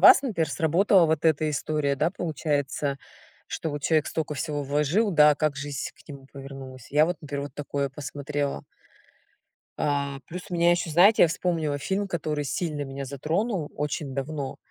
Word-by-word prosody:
вас, 265 - +9
например, 170 - 0
сработала 170 +5 +4
вот 160 +1 0
эта 155 0 +2
история, 145 -1 0
да, 170 - +2
получается, 145 -5 -2 0.5
что 160 - -3
вот 145 0 -5
человек 155 -2 +2
столько 155 -2 -2
всего 145 +1 -2
вложил, 150 +10 +2
да, 150 -3 +6
как 155 -1 0
жизнь 145 -2 -4
к - - -22
нему 140 -2 -10
повернулась. 135 -2 -9
Я 150 +2 +5
вот, 175 -1 -2
например, 140 -1 -4
вот 145 - -7
такое 140 -1 -2
посмотрела. 145 - -3 1.1
А. 140 -1 -1
Плюс 180 +2 -6
у 180 - -3
меня 170 0 +4
ещё, 175 -1 +1
знаете, 190 +8 +6
я 170 - +7
вспомнила 165 -4 -1
фильм, 195 +6 -1
который 155 -4 -2
сильно 150 0 -2
меня 135 0 -5
затронул 160 - -2
очень 145 -2 -3
давно. 140 0 -3
150 Hz, 165 wpm, -26 LUFS, 140-165 Hz, 1.1 s, вас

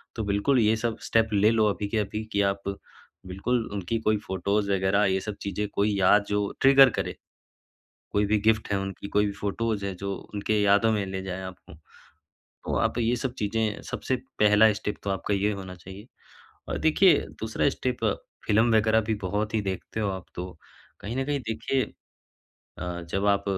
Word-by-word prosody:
तो 110 - -2
बिल्कुल 100 +6 +2
ये 110 0 +4
सब 115 0 -2
स्टेप 115 0 +3
ले 105 +2 +4
लो 110 -1 +3
अभी 100 0 -2
के 110 - -1
अभी 105 +1 -3
कि 100 - +2
आप 100 0 0 0.6
बिल्कुल 115 +6 -1
उनकी 100 +3 -2
कोई 110 -1 +2
फोटोज़ 100 +2 0
वग़ैरह 95 +1 +2
ये 95 0 +2
सब 105 -2 -5
चीज़ें 100 +1 -2
कोई 100 0 +1
याद 100 +2 +5
जो 105 -1 0
ट्रिगर 135 0 +8
करे, - - -2 1.0
कोई 105 0 +2
भी 105 +1 +2
गिफ्ट 110 -1 +2
हैं 100 - +2
उनकी, 95 +1 -5
कोई 105 0 +2
भी 100 - -2
फोटोज़ 105 +1 -2
हैं 95 - -3
जो 100 +1 -3 0.2
उनकी 105 +1 +1
यादों 100 +3 +4
में 105 -2 0
ले 95 0 -4
जाए 95 0 -5
आपको। 95 -3 -10 0.7
तो - - -6
आप - - 0
ये 115 +1 +2
सब 130 0 -3
चीज़ें 105 0 -1
सबसे 130 - -1 0.2
पहला 105 +1 +6
स्टेप 105 +1 -4
तो 100 - -3
आपका 95 +1 -1
ये 100 +2 +1
होना 95 -2 -7
चाहिए। 95 +5 -12 0.6
और - - -2
देखिए 165 +4 +5 0.2
दूसरा 110 +5 0
स्टेप 125 -3 -3 0.4
फ़िल्म 110 +2 +3
वग़ैरह 110 +1 +4
भी 110 - +2
बहुत 105 +4 -2
ही 110 - +2
देखते 95 +3 -4
हो 105 - 0
आप, 95 -2 -5
तो 90 -2 -7 0.4
कहीं 115 +4 -5
न 135 - 0
कहीं 145 -1 -1
देखिए 130 +4 0 1.0
अ, 90 -1 -4
जब 100 +1 0
आप 100 0 +2
105 Hz, 190 wpm, -26 LUFS, 100-110 Hz, 1.0 s, ट्रिगर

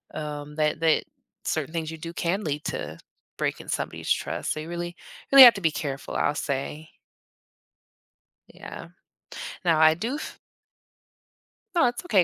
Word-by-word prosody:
um, 150 -1 -6
that 155 0 +1
that 165 -1 +3 0.4
certain - - -1
things 160 -1 -3
you 160 - -7
do 165 +1 -6
can 180 +4 -1
lead 150 -1 -2
to 75 +2 -4 0.4
breaking - - -2
somebody's - - -3
trust, - - -1
so, 155 - -6
you 155 - -6
really 175 0 -4 0.4
really 275 -1 +12
have 240 - +11
to 195 - -5
be 165 - +3
careful, 140 -4 -5
I'll 145 - +1
say. 145 +3 -3 1.6
Yeah. - - -10 0.8
Now 165 -2 +4
I 160 0 +7
do 225 - -3
f 305 - -7 1.4
No, 265 -8 +5
it's 240 0 -3
okay 190 -6 +4
160 Hz, 150 wpm, -26 LUFS, 150-175 Hz, 1.6 s, really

